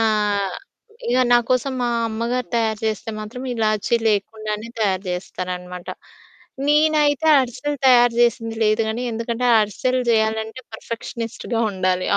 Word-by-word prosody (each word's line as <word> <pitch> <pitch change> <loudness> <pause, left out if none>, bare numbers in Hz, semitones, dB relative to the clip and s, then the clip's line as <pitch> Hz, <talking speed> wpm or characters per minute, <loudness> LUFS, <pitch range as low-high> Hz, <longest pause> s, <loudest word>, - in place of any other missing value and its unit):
ఆహ్, 210 -3 +1 0.5
ఇగ 245 +1 +2
నాకోసం 250 +3 +2
మా 240 - +1 0.2
అమ్మగారు 235 +3 -2
తయారు 220 -2 0
చేస్తే 220 0 -2
మాత్రం, 220 +4 -7
ఇలాచి 215 -1 0
లేకుండానే 215 +1 -2
తయారు 190 -3 +1
చేస్తారనమాట. 180 0 -5 0.8
నేనైతే 300 -1 +3
అరిసెలు 260 +4 -3
తయారు 245 -2 +6
చేసింది 230 -1 +1
లేదు 215 +1 +3
గానీ, 230 +3 -2
ఎందుకంటే 230 +2 -2
అరిసెలు 255 +5 0
చేయాలంటే 220 +2 0
పర్ఫెక్షనిస్ట్‌గా 230 +1 -5
ఉండాలి. 185 -1 0
225 Hz, 115 wpm, -21 LUFS, 210-245 Hz, 0.8 s, తయారు